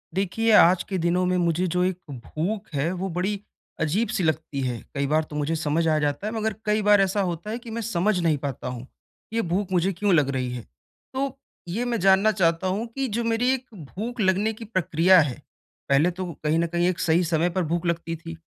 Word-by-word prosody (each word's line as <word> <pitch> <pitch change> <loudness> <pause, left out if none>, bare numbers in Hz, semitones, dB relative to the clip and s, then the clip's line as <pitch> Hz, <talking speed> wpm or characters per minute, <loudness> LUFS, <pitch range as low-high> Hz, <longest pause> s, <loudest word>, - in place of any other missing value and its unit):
देखिए, 220 +4 +1
आज 180 -3 +6
के 190 - -1
दिनों 175 +2 +1
में 180 0 +1
मुझे 175 +1 +1
जो 180 0 +2
एक 185 -1 0
भूख 170 - -4
है, 145 +4 0
वो 185 +1 -3
बड़ी 200 +3 -1 0.4
अजीब-सी 185 +5 0
लगती 155 -3 -1
है। 125 -3 -2 0.2
कई 140 0 0
बार 155 +2 +2
तो 150 - -10
मुझे 150 +2 -1
समझ 160 +1 0
आ 155 -1 +3
जाता 145 +6 -1
है, 215 - -3
मगर 220 -1 -1
कई 210 0 +2
बार 205 -1 +5
ऐसा 195 +1 +1
होता 175 +1 -3
है 225 - -2
कि 235 -2 -10
मैं 230 +1 -3
समझ 205 -2 0
नहीं 165 -3 +2
पाता 135 -3 -5
हूँ। 125 0 -6 0.5
ये 230 - +1
भूख 190 +1 -2
मुझे 185 +1 +2
क्यों 200 +2 +1
लग 150 -5 +3
रही 130 -2 -2
है? 125 - -5 0.5
तो 270 0 -3 0.3
ये 215 +8 -2
मैं 240 -2 -1
जानना 195 +3 +5
चाहता 170 -2 +1
हूँ 205 +5 -1
कि 270 -1 -1
जो 235 +1 -2
मेरी 230 +2 +1
एक 260 -1 -4 0.3
भूख 235 +5 -5
लगने 200 +3 +2
की 225 +1 -9
प्रक्रिया 185 -3 +4
है 140 -5 -3 0.5
पहले 140 +5 +4
तो 185 +1 -5 0.2
कहीं 155 +1 +2
न 170 - +1
कहीं 175 +1 +1
एक 180 -1 -1
सही 170 +2 +2
समय 165 +1 +1
पर 185 +1 -1
भूख 170 +2 -2
लगती 170 -1 -1
थी। 165 0 -8
180 Hz, 225 wpm, -25 LUFS, 160-210 Hz, 0.5 s, आज